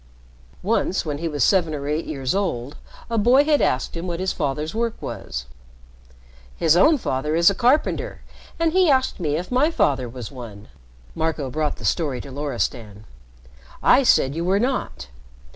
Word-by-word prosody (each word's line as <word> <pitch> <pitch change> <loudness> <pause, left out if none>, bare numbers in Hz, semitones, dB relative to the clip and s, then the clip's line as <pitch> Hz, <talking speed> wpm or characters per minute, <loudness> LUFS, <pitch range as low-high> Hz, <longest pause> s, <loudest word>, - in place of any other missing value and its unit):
Once, 185 - 0
when 145 -2 -3
he 165 - -2
was 150 -2 -1
seven 170 -6 +2
or 140 -1 -5
eight 150 +2 -1
years 135 -4 -2
old, 150 -9 -2 0.3
a 230 -1 -1
boy 250 +6 +5
had 295 -1 +3
asked 130 - 0
him 170 +2 -4
what 170 -1 -3
his 185 0 -1
father's 150 0 -2
work 230 0 -2
was. - - -6 1.1
"His 160 0 +3
own 305 - +5
father 150 - -2
is 170 +3 +5
a - - -2
carpenter, 255 +7 +1 0.4
and 330 -1 +1
he 370 -2 +4
asked 260 -5 +2
me 150 -4 -1
if 175 +7 -4
my 265 +5 +3
father 135 - 0
was 120 0 -8
one," 110 -6 -10 0.4
Marco 160 -4 -2
brought 150 +1 -1
the 110 - -9
story 135 - 0
to 140 - -10
Loristan. 120 -7 -4 0.8
"I 255 - +6
said 140 - +3
you 165 +2 -3
were 190 +3 +2
not. 245 - -2
160 Hz, 175 wpm, -22 LUFS, 135-215 Hz, 1.1 s, I